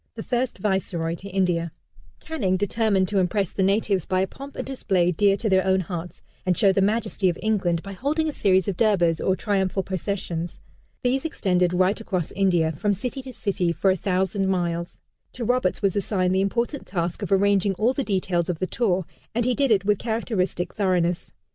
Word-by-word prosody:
The 220 - -6
first 250 0 -1
Viceroy 185 -4 -1
to 190 +4 -8
India, 175 -3 0 0.5
Canning, 200 -13 -1
determined 205 -1 +1
to 200 - +1
impress 190 +1 +1
the - - -2
natives 195 -1 +2
by 185 0 +1
a - - +2
pomp 275 +7 -11
and - - -4
display 190 -9 +1
dear 195 +3 +3
to 225 - -2
their 190 -2 +3
own 190 0 +2
hearts, 175 0 -6 0.2
and 180 -1 +1
show 195 - +5
the 195 - +2
majesty 210 -1 +1
of 175 - -2
England, 190 -6 0
by 195 0 -7
holding 295 - -1
a - - 0
series 190 - +2
of 200 - -1
Durbars, 175 -7 +2
or 190 - +2
triumphal 195 -1 0
processions. 180 -3 -3 0.4
These 255 +2 +1
extended 180 - +1
right 185 +4 +2
across 185 -7 -2
India, 175 -5 +2
from 200 +7 0
city 250 +6 -4
to 260 0 -8
city, 190 -7 -1
for 180 +4 +2
a - - +2
thousand 190 +1 0
miles. 175 -2 -2 0.3
To 240 - -4
Roberts 245 -6 +1
was 195 -2 +2
assigned 185 -2 0
the 190 - +2
important 235 +8 -1
task 170 -2 -2
of - - -4
arranging 195 0 +3
all 225 +7 +2
the 275 - -1
details 185 -5 0
of 175 - -1
the 185 - -1
tour, 190 -4 0 0.3
and 235 0 +1
he 250 - +2
did 275 +1 +1
it 200 -3 +3
with 205 -1 +2
characteristic 200 -6 -1
thoroughness. 180 -4 0
195 Hz, 200 wpm, -24 LUFS, 180-215 Hz, 0.5 s, show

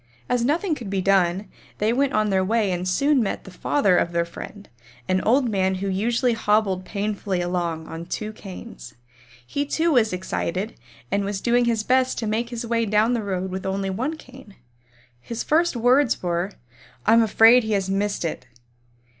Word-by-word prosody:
As 245 -1 +1
nothing 320 +7 +1
could 235 -9 -6
be 195 0 -1
done, 190 0 +2 0.3
they 215 +2 +1
went 275 +2 +1
on 215 -1 +1
their 190 -1 +2
way 210 0 +1
and 180 0 -2
soon 280 +8 +2
met 205 - -2
the 190 - -11
father 185 0 +2
of 170 - 0
their 170 0 +1
friend, 200 +4 -10 0.4
an 185 0 +1
old 250 +3 +3
man 190 -3 +1
who 195 +2 -3
usually 235 +6 +1
hobbled 210 -4 +1
painfully 200 -2 -2
along 175 -2 -2
on 165 +1 -7
two 215 +4 -4
canes. 185 - -10 0.5
He 285 - -2
too 325 +3 0
was 235 -6 +3
excited 185 +2 -3 0.4
and 200 0 +1
was 200 0 -3
doing 240 +3 +2
his 230 -2 0
best 255 +2 +2
to 230 - -2
make 220 +2 -1
his 240 -1 -5
way 230 -1 0
down 215 +3 +3
the 235 - 0
road 190 -2 -3
with 190 0 -4
only 195 0 -2
one 265 +11 -2
cane. 255 -8 -15 0.6
His 230 - -5
first 330 0 +2
words 245 +1 +3
were, 175 +2 -1 0.5
"I'm 230 +1 +6
afraid 225 +2 +6
he 220 -1 -1
has 195 -2 0
missed 200 -1 -1
it." 140 -5 -4
210 Hz, 185 wpm, -23 LUFS, 190-235 Hz, 0.6 s, I'm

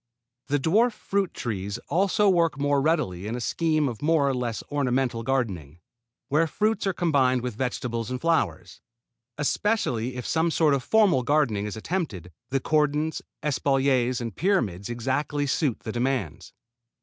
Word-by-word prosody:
The 145 +1 +1
dwarf 215 - +3
fruit 200 -3 -1
trees 100 -3 -4
also 200 +4 +2
work 170 -6 +3
more 145 0 +2
readily 135 - 0
into 115 +3 -3
a - - -4
scheme 155 +4 +1
of 115 -5 -5
more 155 -2 +3
or 135 - +1
less 120 -3 -3
ornamental 130 -4 0
gardening, 105 - -2 0.5
where 155 +4 +2
fruits 215 +5 0
are - - +3
combined 135 -8 +2
with 125 -2 -3
vegetables 120 -1 -3
and 125 0 -3
flowers. 160 - -1 0.6
Especially 145 - 0
if 125 - -5
some 165 +1 +1
sort 155 -2 +3
of 135 - +1
formal 210 -11 +4
gardening 120 -7 +1
is 105 - -6
attempted, 110 - -4 0.2
the 135 - +1
cordons, 150 +2 0 0.2
espaliers 135 -3 +1
and 115 -4 -5
pyramids 115 - 0
exactly 135 +5 -1
suit 135 -2 0
the 110 - -5
demands. 120 - -2
135 Hz, 150 wpm, -26 LUFS, 120-160 Hz, 0.6 s, formal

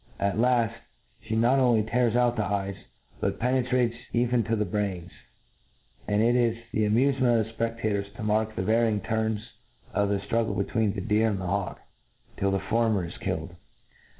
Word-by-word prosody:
At 100 +1 0
laft, 120 -2 +3 0.5
flic 110 0 -1
not 120 +4 +4
only 120 -4 +4
tears 120 +1 +1
out 120 -1 +3
the 110 - 0
eyes, 100 -1 -2 0.5
but - - -1
penetrates 125 -1 +1 0.2
even 120 0 +2
to 115 - 0
the 105 -1 0
brains; 90 -3 -3 1.0
and 105 +1 +2
it 120 +1 +3
is 120 -2 +2
the 110 - +1
amufcment 120 +1 +3
of 110 +1 -6
thefpeftators 110 -3 -2
to 115 - -7
mark 110 +1 0
the - - -2
varying 110 0 +2
turns 110 -1 -1 0.5
of 100 -1 +1
the 100 - +1
ftruggle 110 +3 -1
be - - +2
tween 110 -4 0
the 100 - -4
deer 110 +2 +2
and 100 -3 -2
the 95 - -4
hawk, 100 +1 -2 0.6
till 100 - 0
the 95 - +1
former 105 -1 +1
is 85 - -9
killed. - - -4
110 Hz, 180 wpm, -27 LUFS, 100-120 Hz, 1.0 s, not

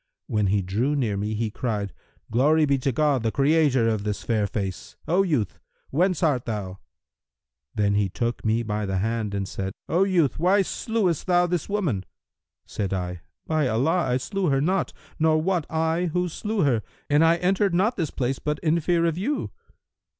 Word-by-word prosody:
When 105 -2 0
he 100 0 +1
drew 115 +11 0
near 120 -8 0
me, 105 +2 -2
he 110 0 -2
cried, 105 -4 -3 0.4
'Glory 150 +7 +4
be 140 -2 +1
to 135 +2 0
God, 140 0 +2
the 110 -1 0
Creator 140 -4 +3
of 110 -3 0
this 105 -1 -3
fair 110 -3 +1
face! 95 -2 -5
O 180 +4 +3
youth, 145 - -1 0.3
whence 180 +5 +1
art 140 -7 +2
thou?' 100 -5 -4 1.0
Then 100 -1 +2
he 100 -1 +1
took 120 +5 -3
me 110 +2 +1
by 105 -2 -2
the 95 0 -1
hand 110 0 -1
and 100 -1 -2
said, 95 0 -4
'O 175 +5 +3
youth, 170 - +1
why 190 +4 +4
slewest 190 -5 -1
thou 175 -1 +4
this 175 -1 -2
woman?' 175 - -1 0.6
Said 100 -2 -3
I, 90 -2 -3 0.2
'By 155 -3 +1
Allah, 155 +10 +1
I 125 - +2
slew 195 +8 -2
her 135 -1 +2
not, 185 +7 0 0.3
nor 155 0 +3
wot 175 -1 0
I 160 +2 0
who 180 +2 0
slew 210 +5 -2
her, 125 -6 +2 0.3
and 145 +2 +4
I 165 +1 +5
entered 185 +2 +1
not 210 +7 +2
this 165 -6 -1
place 130 0 -2
but 150 0 -2
in 165 +1 +3
fear 170 +1 +1
of 165 0 0
you!' 280 +10 -2
140 Hz, 185 wpm, -25 LUFS, 110-170 Hz, 1.0 s, I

